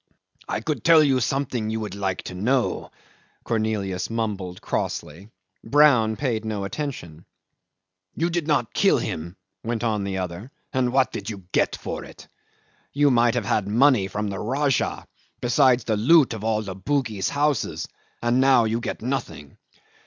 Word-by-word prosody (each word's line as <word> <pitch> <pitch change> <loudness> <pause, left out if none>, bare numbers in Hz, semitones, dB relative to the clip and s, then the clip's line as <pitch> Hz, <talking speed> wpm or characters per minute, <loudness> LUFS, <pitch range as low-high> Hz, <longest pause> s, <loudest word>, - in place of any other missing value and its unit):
"I - - -2
could 150 -7 -3
tell 165 -2 +7
you 135 -3 +3
something 125 -3 -1
you 110 0 -2
would 105 -3 -5
like 95 -2 -3
to - - -7
know," 120 +7 0 0.5
Cornelius 110 -5 -2
mumbled 100 -6 -3
crossly. 85 +8 -4 0.3
Brown 130 -7 +4
paid 115 -4 -2
no 110 -2 -3
attention. 100 - -5 0.9
"You 170 +2 0
did 165 -2 -2
not 145 -7 +1
kill - - +4
him," 85 +3 -4 0.3
went 115 0 -2
on 110 -3 0
the 100 -1 -3
other, 90 +5 -5 0.2
"and 125 -1 +1
what 130 0 +2
do - - -4
you 100 -4 -6
get - - +1
for - - -6
it? - - -13 0.6
You 145 0 +3
might 120 -1 +3
have 120 -4 -1
had 100 0 0
money 120 -1 +4
from 105 +2 -3
the 95 -1 -4
Rajah, 135 +4 0 0.3
besides 125 0 +3
the 110 -2 0
loot 140 +4 +5
of 110 -2 -7
all 110 -1 0
the 95 -2 -6
Bugis 110 -1 -1
houses, 145 -2 0 0.4
and 120 +2 +3
now 130 -3 +5
you 110 +1 0
get 115 - -5
nothing." 120 - -4
115 Hz, 160 wpm, -24 LUFS, 100-135 Hz, 0.9 s, tell